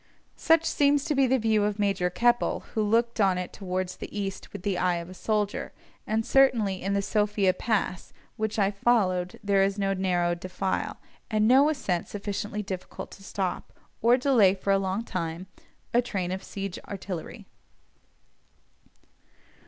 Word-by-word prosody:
Such 325 0 +3
seems 285 -2 +2
to 320 - 0
be 270 -2 +3
the 265 +1 +3
view 220 -3 +2
of 205 0 0
Major 195 -3 +1
Keppell, 240 +6 +1
who 220 - 0
looked 230 +2 +1
on 190 -2 +3
it 180 0 -5
towards 185 -1 -3
the - - -7
east 195 -1 -5
with - - -8
the 195 -3 -1
eye 180 -1 +2
of 170 0 -5
a - - -8
soldier, 210 +2 -2 0.3
and 220 +1 0
certainly 225 -8 +3
in 195 +2 -1
the 200 - 0
Sophia 205 -2 +2
Pass, 200 -3 -2 0.2
which 220 0 -2
I 200 -1 +3
followed, 195 -4 +1
there 200 -1 +3
is 195 +1 +1
no 195 -1 +1
narrow 180 -2 +1
defile, 185 +2 -3 0.3
and 215 -1 +2
no 270 +5 +6
ascent 200 - -1
sufficiently 205 +1 -4
difficult 190 -2 -7
to 195 - -13
stop, 190 -2 -3 0.3
or 235 +2 +5
delay 240 -8 +4
for 195 +1 +1
long 195 +2 -1
time, 170 -3 -4 0.5
a 240 - +5
train 190 -7 -3
of 190 +1 -4
siege 195 -2 -5
artillery. 190 -4 -6
200 Hz, 160 wpm, -27 LUFS, 185-225 Hz, 0.5 s, no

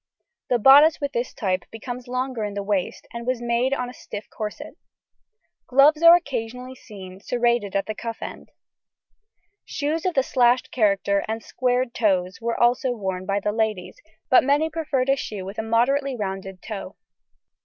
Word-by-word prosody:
The 245 - +3
bodice 285 +7 +7
with 285 -1 -3
this 240 +2 -2
type 185 -5 -2
becomes 245 +3 -7
longer 255 -2 -3
in 205 -1 -4
the 200 - -3
waist, 200 -2 -2
and 235 +1 -7
was 255 -1 0
made 240 +2 0
on 250 -3 -1
a 245 - -9
stiff 210 -3 -9
corset. 210 -1 -6 0.9
Gloves 285 +4 +5
are 335 0 +9
occasionally 250 -5 -4
seen, 195 -7 -12
serrated 235 -3 0
at 195 - +1
the 215 - -4
cuff 230 +1 -6
end. - - -8 1.1
Shoes 315 +4 -2
of 360 - -2
the 270 - +3
slashed 250 -1 +2
character 200 -3 +1
and 220 +1 -4
square 250 0 0
toes 200 -5 -1
were 235 0 -2
also 245 +2 +2
worn 190 -4 -4
by 200 0 +1
the 210 +1 -1
ladies, 215 -4 -2 0.3
but 255 - +5
many 290 +4 +1
preferred 295 -5 -1
a 275 - +5
shoe 210 -8 -6
with 200 +3 -7
a - - +1
moderately 255 +5 +1
rounded 195 -3 -5
toe. 210 -3 -7
235 Hz, 170 wpm, -23 LUFS, 205-260 Hz, 1.1 s, are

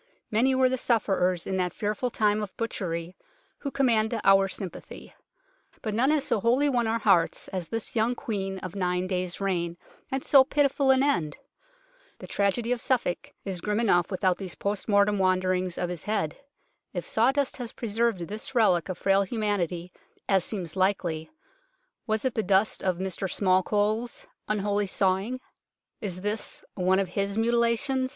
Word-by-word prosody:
Many 250 +5 +3
were 260 0 +4
the 255 0 -1
sufferers 190 -7 +1
in 190 - -2
that 180 -1 -1
fearful 215 +4 -1
time 210 -2 +1
of 205 -3 -7
butchery 180 -6 -3 0.4
who 280 - -3
command 230 -5 +1
our 195 0 +5
sympathy, 190 -2 -7 0.7
but 215 - -2
none 245 +6 +2
has 300 -2 +2
so - - +1
wholly 245 +7 +3
won 240 -4 +1
our 225 +1 +1
hearts 195 -7 +2
as 185 -4 -4
this 225 +1 -5
young 230 +2 +2
Queen 195 -7 -3
of 185 -2 -5
a 200 - -6
nine 180 0 0
days' 180 -1 -2
reign, 175 -3 -1 0.3
and 265 0 -2
so 275 -2 +7
pitiful 280 0 +1
an 265 0 +5
end. 170 - 0 0.8
The - - -10
tragedy 205 +4 0
of 245 -2 0
Suffolk 240 -9 -1
is 190 -3 -3
grim 210 +2 -1
enough 175 -7 +3
without 185 -2 +1
these 190 -3 -6
port 200 0 -2
mortem 205 -1 +3
wanderings 185 -1 +1
of 175 - -1
his 175 -3 -5
head. 205 -8 -1 0.6
If - - -4
sawdust 265 +5 +1
has 245 -3 -5
preserved 230 -3 -1
this 210 +9 -6
relic 190 -7 +3
of 185 - -3
frail 195 0 +3
humanity, 190 -5 -2 0.3
as 190 -3 +3
seems 180 -6 -4
likely, 185 -4 0 0.8
was 220 +2 -1
it 260 - +1
the 220 - 0
dust 200 +1 +2
of 185 -2 +1
"Mr 190 0 -3
Smallcole's 205 +4 +1
" - - -53
unholy 205 -1 0
sawing? 195 +6 0 0.6
Is 185 -5 -4
this 210 +2 -3
one 185 0 +2
of 195 -2 0
his 200 +2 -2
mutilations 235 +3 +1
205 Hz, 170 wpm, -27 LUFS, 185-230 Hz, 0.8 s, so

